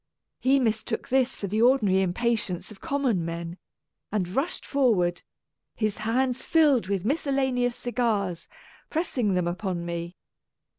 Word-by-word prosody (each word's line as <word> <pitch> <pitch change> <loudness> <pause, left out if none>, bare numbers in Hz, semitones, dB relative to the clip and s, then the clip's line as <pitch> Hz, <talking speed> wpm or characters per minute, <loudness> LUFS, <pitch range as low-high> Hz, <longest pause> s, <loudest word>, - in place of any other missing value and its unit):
He 270 +2 +4
mistook 225 +1 -1
this 265 0 +2
for - - -5
the 210 +3 0
ordinary 220 -7 +4
impatience 205 0 -1
of 205 - -13
common 260 -10 0
men, 170 +1 -5 0.5
and 200 -4 0
rushed 270 - -2
forward, 205 -11 +2 0.5
his 215 -2 -1
hands 250 +4 0
filled 295 - +3
with 200 -1 -1
miscellaneous 265 -3 +1
cigars, 210 -8 -1 0.4
press 325 +2 -2
ing 205 -5 +2
them 180 -1 +1
upon 175 -1 -3
me. 170 +1 -4
220 Hz, 135 wpm, -26 LUFS, 185-260 Hz, 0.5 s, He